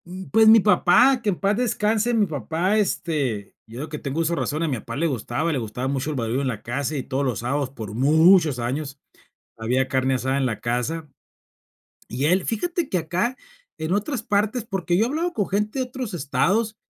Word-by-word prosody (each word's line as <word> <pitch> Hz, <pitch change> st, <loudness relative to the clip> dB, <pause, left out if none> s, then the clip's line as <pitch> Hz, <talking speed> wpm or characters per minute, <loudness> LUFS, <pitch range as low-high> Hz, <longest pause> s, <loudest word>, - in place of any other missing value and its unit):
Mm, 185 Hz, +2 st, -8 dB
pues, 220 Hz, +1 st, +5 dB
mi 225 Hz, +1 st, +9 dB
papá, 240 Hz, +6 st, +4 dB
que 215 Hz, -, 0 dB
en 195 Hz, -, +1 dB
paz 200 Hz, +1 st, +1 dB
descanse, 225 Hz, -1 st, +1 dB
mi 220 Hz, -3 st, +3 dB
papá, 165 Hz, -, -1 dB
este 140 Hz, -, -1 dB
yo 115 Hz, +2 st, -9 dB
desde 155 Hz, -, -6 dB
que 150 Hz, -, -6 dB
tengo 140 Hz, +2 st, -4 dB
uso 165 Hz, +1 st, 0 dB
de -, -, -2 dB
razón, 155 Hz, +3 st, -2 dB
a -, -, 0 dB
mi 135 Hz, -4 st, -1 dB
papá -, -, -7 dB
le 160 Hz, +4 st, 0 dB
gustaba 140 Hz, +4 st, -2 dB
le 140 Hz, -, -1 dB
gustaba 120 Hz, +3 st, -4 dB
mucho 140 Hz, +2 st, -2 dB
el 155 Hz, -, -3 dB
barullo 120 Hz, +1 st, -1 dB
en 140 Hz, -, -1 dB
la 115 Hz, -5 st, -4 dB
casa, 140 Hz, +5 st, -2 dB
y 130 Hz, -, -3 dB
todos 135 Hz, +2 st, -2 dB
los 125 Hz, -6 st, -1 dB
sábados, 135 Hz, +3 st, -1 dB
por 110 Hz, -6 st, -8 dB
muchos 155 Hz, -, +4 dB
años, 135 Hz, +3 st, -3 dB, 0.6 s
había 125 Hz, +4 st, 0 dB
carne 130 Hz, 0 st, +1 dB
asada 130 Hz, +1 st, -1 dB
en 135 Hz, -, +1 dB
la 115 Hz, -4 st, -3 dB
casa. 135 Hz, +7 st, -2 dB, 1.0 s
Y 130 Hz, +4 st, -2 dB
él, 180 Hz, +5 st, +2 dB
fíjate 335 Hz, -, -2 dB
que 185 Hz, -, 0 dB
acá, 180 Hz, +10 st, -1 dB, 0.4 s
en 160 Hz, +3 st, -2 dB
otras 220 Hz, +4 st, -1 dB
partes, 210 Hz, +3 st, 0 dB
porque 185 Hz, -5 st, -1 dB
yo 210 Hz, -, +4 dB
he -, -, -1 dB
hablado 330 Hz, +6 st, -2 dB
con 205 Hz, -, -1 dB
gente 210 Hz, +6 st, -1 dB
de 260 Hz, -, 0 dB
otros 250 Hz, -4 st, -6 dB
estados, 200 Hz, +8 st, 0 dB
160 Hz, 215 wpm, -23 LUFS, 130-210 Hz, 1.0 s, mi